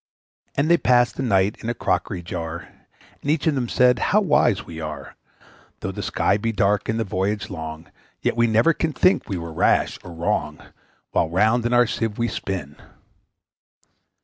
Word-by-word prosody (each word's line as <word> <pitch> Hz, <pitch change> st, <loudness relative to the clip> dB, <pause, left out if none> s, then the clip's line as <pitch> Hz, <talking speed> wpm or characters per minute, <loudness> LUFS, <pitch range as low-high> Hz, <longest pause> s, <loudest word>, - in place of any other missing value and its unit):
And 140 Hz, +2 st, +1 dB
they 170 Hz, +1 st, +5 dB
passed 120 Hz, -1 st, +3 dB
the -, -, -4 dB
night 100 Hz, -4 st, +2 dB
in 115 Hz, -, -4 dB
a 120 Hz, -, -1 dB
crockery 95 Hz, -5 st, -1 dB
jar, 85 Hz, 0 st, -6 dB, 0.5 s
And 145 Hz, -, -4 dB
each 150 Hz, -1 st, +1 dB
of 160 Hz, -, +3 dB
them 125 Hz, -4 st, -2 dB
said, 125 Hz, -1 st, +4 dB
`How 210 Hz, +10 st, +2 dB
wise 135 Hz, -, +2 dB
we 80 Hz, -, -8 dB
are! 75 Hz, -3 st, -7 dB, 0.7 s
Though -, -, -3 dB
the -, -, -6 dB
sky 100 Hz, -, +1 dB
be 115 Hz, +2 st, -1 dB
dark, 100 Hz, 0 st, +1 dB
and 110 Hz, +1 st, 0 dB
the -, -, +1 dB
voyage 100 Hz, +1 st, -2 dB
be -, -, -7 dB
long, 80 Hz, -1 st, -7 dB, 0.3 s
Yet -, -, -1 dB
we 120 Hz, 0 st, +3 dB
never 115 Hz, +9 st, +4 dB
can 160 Hz, -1 st, -2 dB
think 185 Hz, -, +2 dB
we 95 Hz, -, -2 dB
were 85 Hz, -1 st, -6 dB
rash -, -, +2 dB
or 90 Hz, -, -9 dB
wrong, 80 Hz, -2 st, -2 dB, 0.5 s
While 80 Hz, -, +1 dB
round 110 Hz, +7 st, +2 dB
in 120 Hz, -, -1 dB
our 120 Hz, 0 st, +5 dB
Sieve 115 Hz, -2 st, -3 dB
we 120 Hz, 0 st, 0 dB
spin!' 75 Hz, -8 st, -5 dB
105 Hz, 190 wpm, -23 LUFS, 85-120 Hz, 0.7 s, they